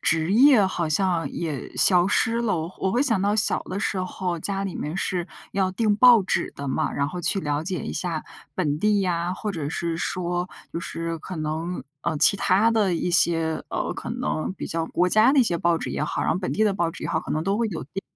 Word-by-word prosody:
职 165 +3 +1
业 250 -3 +6
好 170 -4 -2
像 175 0 0
也 155 -6 -5
消 180 -1 +5
失 230 +3 +2
了。 215 -7 0
我 165 +3 -5
我 190 - 0
会 245 +7 +2
想 225 -9 +1
到 205 +2 +1
小 210 - +3
的 190 - -5
时 200 -2 -1
候， 185 -1 -3
家 195 +3 -2
里 190 - -4
面 155 +5 -4
是 180 -2 -2 0.2
要 190 -1 +1
订 210 +1 +1
报 235 0 +7
纸 185 - -1
的 140 - -6
嘛， 130 - -1
然 140 - -1
后 180 +4 -5
去 195 +3 +1
了 145 -2 -2
解 185 +1 -3
一 - - -5
下 170 -4 -3 0.3
本 150 -5 -1
地 210 +1 +2
呀， 175 0 -1
或 210 +2 -4
者 155 -5 -4
是 165 +1 -3
说 175 +1 -2 0.2
就 170 - -3
是 165 0 -4
可 185 +3 -8
能， 160 +3 -4 0.2
呃， 155 - -2
其 200 - +6
他 200 +3 +3
的 205 -6 +2
一 175 +2 -1
些， 165 -2 +2
呃， - - -2
可 - - -7
能 155 - -2
比 - - -6
较 165 0 -2
国 180 +2 +1
家 215 +8 +4
的 - - +4
一 - - +7
些 175 -7 0
报 170 0 +2
纸 - - -5
也 - - -3
好， - - -2
然 - - 0
后 170 - -2
本 185 - -3
地 215 - +1
的 210 - +2
报 175 -4 -1
纸 - - -11
也 - - -3
好， 160 - 0
可 - - -9
能 155 +2 -1
都 195 +2 0
会 230 -1 0
有 165 -9 -5
订。 150 +7 -7
180 Hz, 265 characters per minute, -24 LUFS, 165-200 Hz, 0.3 s, 报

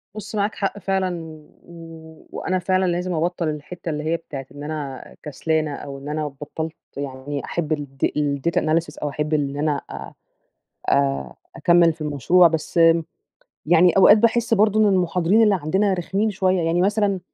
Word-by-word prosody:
بُص 215 0 -7
معاك 205 +1 0
حق 200 0 -2
فعلًا، 190 -3 -1 0.4
و 165 -1 -13
وأنا 185 0 -2
فعلًا 185 +1 +1
لازم 180 0 -1
أبطل 170 +1 -1
الحتة 155 +3 -6
اللي 150 -1 -3
هي 160 +2 0
بتاعة 140 -4 -8
إن 145 +1 -9
أنا 145 -3 -5 0.2
كسلانة 155 0 -1
أو 140 -1 -8
إن 140 +2 -8
أنا 150 0 -2
بطلت 150 +3 -6 0.2
يعني 140 +1 -5
أحب 165 -2 -3
الد 140 -3 -3
الdata 145 +2 0
analysis 155 0 -1
أو 145 - 0
أحب 150 +2 -3
إن 140 -2 0
أنا 145 -1 0
آآ، - - -8 0.8
أ 70 -2 +1 0.2
أكمل 170 -1 +4
في 160 - -21
المشروع، 155 +4 +4
بس 160 +1 -2 0.9
يعني 175 +2 +5
أوقات 205 +2 +8
باحس 230 +1 +2
برضو 215 0 +3
إن 215 - +5
المحاضرين 180 +3 +2
اللي 210 -2 +4
عندنا 190 +7 +1
رخمين 195 +4 -1
شوية، 190 -2 +1
يعني 165 +2 +1
مثلًا 200 0 +1
165 Hz, 165 wpm, -22 LUFS, 150-185 Hz, 0.9 s, أوقات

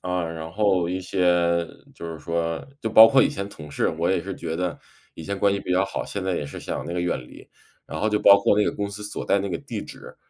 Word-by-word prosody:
啊， 90 -1 -2
然 80 0 -6
后 95 -2 +1
一 90 +1 -2
些 90 -2 +1 0.3
就 85 - -8
是 80 - -7
说 85 +1 -3
就 110 - -2
包 110 +1 +9
括 130 +2 +5
以 - - +3
前 100 -10 -4
同 75 -7 -11
事， 70 - 0
我 85 +2 -1
也 95 -2 +1
是 95 +1 -5
觉 80 -1 -4
得 90 -1 -2 0.3
以 - - -10
前 100 +4 -4
关 100 0 +3
系 100 - -2
比 - - -7
较 95 +2 +3
好， 100 - -4
现 100 -2 -5
在 95 -2 0
也 75 - -3
是 - - -8
想 - - -4
那 85 - -4
个 90 - -1
远 90 -5 -1
离。 - - -14 0.4
然 80 +2 -6
后 110 - +1
就 105 0 +1
包 100 -1 +7
括 100 - +3
那 105 - +3
个 - - 0
公 100 0 -3
司 105 +1 -8
所 105 - -5
在 100 - +3
那 100 0 -3
个 85 - -2
地 - - -6
址， - - -12
90 Hz, 295 characters per minute, -24 LUFS, 85-100 Hz, 0.4 s, 包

